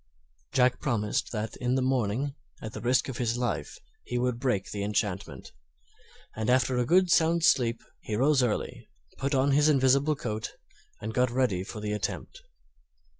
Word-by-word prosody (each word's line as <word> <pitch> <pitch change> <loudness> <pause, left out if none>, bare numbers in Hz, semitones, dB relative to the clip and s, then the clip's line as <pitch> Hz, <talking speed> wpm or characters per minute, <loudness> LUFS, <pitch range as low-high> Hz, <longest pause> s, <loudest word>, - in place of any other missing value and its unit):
Jack 125 -1 +3
promised 105 -6 -1
that 110 -1 -4
in 125 +1 0
the 130 - +1
morning, 130 +1 0 0.3
at 110 - -7
the - - -6
risk 125 +1 +2
of 130 -3 -5
his 120 -1 0
life, 120 -12 -3 0.3
he 125 - -3
would 125 -1 0
break 120 -7 -1
the 100 - -4
enchantment; 100 -2 -3 0.8
and 110 +1 -2
after 125 0 +3
a 180 +10 +4
sound 170 -1 +3
sleep 115 -6 +3 0.2
he 110 - -4
rose 135 +4 +3
early, 120 -4 -2 0.3
put 140 +1 0
on 135 +2 +3
his 145 +2 +4
invisible 140 +2 +3
coat, 110 -5 -4 0.5
and 110 +1 -4
got 125 +1 +2
ready 120 -7 0
for 105 +2 -8
the 105 0 -2
attempt. 105 -3 -4
125 Hz, 165 wpm, -28 LUFS, 110-135 Hz, 0.8 s, a